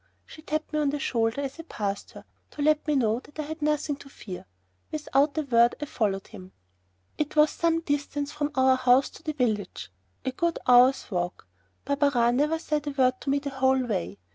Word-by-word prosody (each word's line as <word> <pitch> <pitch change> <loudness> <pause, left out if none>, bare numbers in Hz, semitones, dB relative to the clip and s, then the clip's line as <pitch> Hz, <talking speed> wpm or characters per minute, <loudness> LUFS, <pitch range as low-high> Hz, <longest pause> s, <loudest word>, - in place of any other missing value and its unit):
She 310 - -13
tapped 310 0 -3
me 305 - +1
on 295 -2 +2
the 290 - -1
shoulder 230 -1 0
as 275 +3 -5
I - - -3
passed 200 -2 -3
her, - - -12 0.2
to 290 - -5
let 305 +1 +2
me 300 - +2
know 230 -3 +2
that 295 - -18
I 305 - -2
had 315 +2 -7
nothing 300 -1 0
to 280 - -14
fear. 185 - -9 0.4
Without 295 -1 +1
a 310 - +1
word 235 -3 +4
I 295 - -3
followed 205 -8 -1
him. 190 -4 -12 0.7
It 300 0 -2
was 300 0 +5
some 330 0 +1
distance 290 -1 -2
from 295 -1 -2
our 260 0 +4
house 255 +1 +4
to - - -14
the 310 - -3
village 215 - -2 0.3
a 260 - 0
good 340 +5 -1
hour's 250 0 +5
walk. 175 - -3 0.4
Barberin 275 -4 +2
never 300 +3 +2
said 300 -2 -2
a - - +1
word 255 -2 +1
to - - -4
me 280 - +3
the 280 0 -4
whole 265 -1 +2
way. 95 - -3
275 Hz, 210 wpm, -27 LUFS, 240-300 Hz, 0.7 s, was